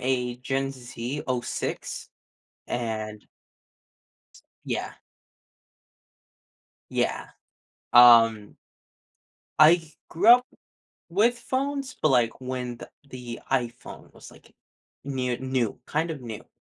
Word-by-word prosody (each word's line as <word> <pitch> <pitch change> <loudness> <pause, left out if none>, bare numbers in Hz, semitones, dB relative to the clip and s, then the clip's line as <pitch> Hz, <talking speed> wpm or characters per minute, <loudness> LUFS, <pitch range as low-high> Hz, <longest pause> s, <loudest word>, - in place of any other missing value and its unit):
a 125 -1 -1
Gen 135 +2 -2
Z 125 +2 -6
'06, 125 -2 -4 0.6
and 110 -3 -4 1.4
Yeah. - - -3 2.0
Yeah, - - -1 0.7
um 115 -3 +7 1.0
I 160 +1 +6 0.2
grew 195 +7 +1
up 245 +1 +8 0.6
with 225 +7 +2
phones, 270 +2 -3
but 155 - +3
like 120 -2 +1
when 125 -1 -4
the - - -11 0.2
the 125 -2 -8
iPhone 120 -3 -3
was - - -14
like - - -19 0.5
new 130 -3 -2
new 130 -4 -2
kind 160 +3 -1
of 150 -5 -5
new. 115 -3 -8
130 Hz, 95 wpm, -26 LUFS, 120-155 Hz, 2.0 s, up